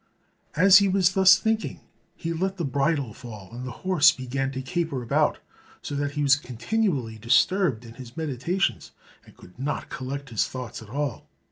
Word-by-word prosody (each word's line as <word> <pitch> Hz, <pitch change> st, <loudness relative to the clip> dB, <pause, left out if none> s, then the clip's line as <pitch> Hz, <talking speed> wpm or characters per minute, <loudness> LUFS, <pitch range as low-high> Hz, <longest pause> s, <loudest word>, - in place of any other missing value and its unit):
As 195 Hz, +4 st, +8 dB
he 200 Hz, -, +2 dB
was 190 Hz, -1 st, +3 dB
thus 190 Hz, +1 st, +7 dB
thinking 220 Hz, +3 st, -1 dB, 0.4 s
he 165 Hz, 0 st, -4 dB
let 190 Hz, +3 st, -2 dB
the 170 Hz, -, -2 dB
bridle 140 Hz, -3 st, 0 dB
fall, 110 Hz, -6 st, -11 dB
and 125 Hz, +2 st, -6 dB
the 130 Hz, +7 st, -10 dB
horse 180 Hz, -6 st, +6 dB
began 135 Hz, +1 st, -3 dB
to 130 Hz, 0 st, -4 dB
caper 160 Hz, -3 st, -2 dB
about, 115 Hz, -, +1 dB, 0.5 s
so -, -, -5 dB
that 145 Hz, 0 st, -2 dB
he 150 Hz, 0 st, -1 dB
was 135 Hz, -1 st, +6 dB
continually 130 Hz, -, -2 dB
disturbed 125 Hz, -, +2 dB
in 115 Hz, -, -11 dB
his 125 Hz, 0 st, -12 dB
meditations, 160 Hz, +5 st, -2 dB, 0.3 s
and -, -, -18 dB
could 90 Hz, +7 st, -17 dB
not 145 Hz, +3 st, -3 dB
collect 135 Hz, +1 st, -6 dB
his 110 Hz, -, +1 dB
thoughts 125 Hz, -4 st, -7 dB
at 110 Hz, -, -13 dB
all. 145 Hz, +4 st, -4 dB
140 Hz, 175 wpm, -25 LUFS, 125-180 Hz, 0.5 s, As